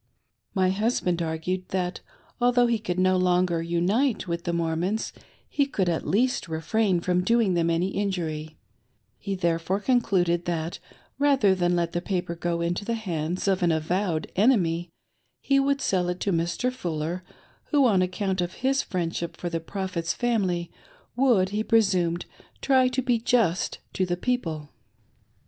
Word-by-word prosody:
My 185 -1 +3
husband 190 -4 0
argued 170 +3 -3
that, 180 -1 -2 0.4
although 245 0 +4
he 235 -2 +1
could 180 -5 -3
no 185 0 +3
longer 180 -2 +2
unite 190 +9 +1
with 170 0 -3
the 175 - 0
Mormons, 170 +5 -1 0.3
he 280 -1 +1
could 195 -9 -1
at 170 -2 -1
least 245 0 +1
refrain 175 +4 0
from 180 0 +1
doing 230 -1 +3
them 170 -1 +1
any 170 +3 +1
injury; 165 -6 -3 0.6
he 200 -1 -3
therefore 170 +1 0
concluded 185 -7 +1
that, 170 -1 -2 0.4
rather 275 -9 +4
than 175 -1 +1
let 170 -1 0
the 175 - -2
paper 180 -2 -2
go 170 0 -2
into 175 +3 -1
the 230 +3 -1
hands 175 -4 -3
of 190 -1 +2
an 175 -1 +3
avowed 160 +1 -1
enemy, 180 -6 +2 0.5
he 275 0 +2
would 275 0 +1
sell 180 -5 +1
it 180 0 -3
to 200 - 0
Mr. 170 +9 0
Fuller, 170 -4 -3 0.4
who, 285 -3 +3
on 200 -6 +4
account 185 0 -1
of 175 0 -3
his 270 +1 +3
friendship 170 -1 -3
for 175 - -4
the 165 - -1
Prophet's 180 -1 -3
family, 190 -8 0 0.4
wsould, 235 -8 +3
he 210 +2 -1
presumed, 185 -7 +2 0.3
try 260 -2 +4
to 255 +1 -1
be 245 -2 +2
just 225 -7 +1 0.2
to 185 - 0
the 175 0 -1
people. 165 -11 -2
185 Hz, 160 wpm, -26 LUFS, 170-220 Hz, 0.6 s, although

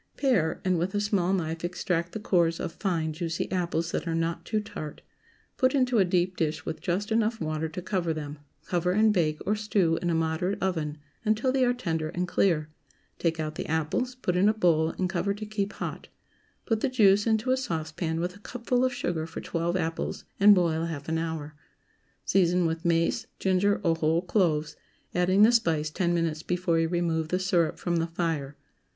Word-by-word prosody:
✠ - - -37
Pare, 215 - +1
and 185 -2 +2
with 185 +4 -2
a - - +2
small 200 -3 +1
knife 165 -3 -2
extract 175 -1 -1
the 220 - -4
cores 170 -5 +2
of - - -3
fine 165 -4 -1
juicy 165 +1 -3
apples 170 -2 -1
that - - -2
are 165 - 0
not 165 0 -1
too 215 - 0
tart; 180 -8 -7 0.5
put 255 +2 +3
into 255 -4 +3
a - - +6
deep 180 0 +1
dish 160 -3 -2
with 160 - -5
just 195 +5 -2
enough 225 0 +1
water 155 0 -2
to 175 +3 -6
cover 180 -3 -1
them; 150 -2 -5 0.3
cover 180 0 0
and 215 +1 +4
bake, 155 -5 +1
or 210 +3 +2
stew, 200 -6 +1
in 175 - 0
a 170 - +1
moderate 165 +4 0
oven, 160 -5 -1 0.3
until 220 +4 +1
they 260 0 +2
are 245 - +4
tender 165 -10 -2
and 180 +1 -1
clear; 165 -4 +2 0.5
take 165 -1 0
out 155 -1 -2
the - - -5
apples, 160 +11 -1
put 185 -8 -2
in 190 +4 +4
a 215 - +1
bowl, 165 -6 +3
and 185 - 0
cover 200 +2 -1
to 215 +1 -6
keep 205 -1 -3
hot; - - -6 0.6
put 225 -2 +1
the 275 - +1
juice 205 -4 +4
into 220 +3 +2
a - - +5
saucepan, 160 -7 -3
with 180 +2 -2
a - - -14
cupful 245 +3 -1
of 255 - +2
sugar 170 -9 -2
for 160 - -7
twelve 170 +1 -1
apples, 165 -2 -3
and 205 +1 +8
boil 165 -3 +1
half 150 -4 -5
an 160 0 0
hour. 160 -2 -4 0.7
Season 180 -1 +3
with 165 0 -2
mace, 170 +6 +1
ginger, 195 +2 +2
or 165 -2 +3
whole 165 +2 +1
cloves, 175 -5 +1 0.4
adding 185 +3 +4
the 225 - +7
spice 160 -10 +1
ten 175 +1 0
minutes 165 -2 0
before 175 -1 0
you 165 - +2
remove 165 -2 0
the 180 - 0
syrup 180 -4 +1
from 175 -1 -1
the 165 0 0
fire. 165 -5 -2
175 Hz, 205 wpm, -27 LUFS, 160-205 Hz, 0.7 s, and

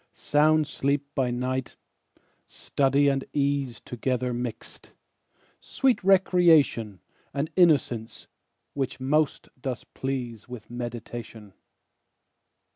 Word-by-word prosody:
Sound 155 +1 +3
sleep 140 0 -1
by 130 -3 0
night; 125 +1 -3 0.7
study 140 +1 +1
and 135 -1 +1
ease 140 -4 0
Together 125 0 -2
mixed; 120 -1 -7 0.7
sweet 260 -6 0
recreation, 170 - +4 0.3
And 140 +3 -2
innocence, 130 -10 +2 0.5
which 135 -2 -3
most 150 +3 0
does 125 -2 -4
please 125 -4 -5
With 120 -2 -9
meditation. 120 -3 -7
130 Hz, 90 wpm, -26 LUFS, 120-145 Hz, 0.7 s, recreation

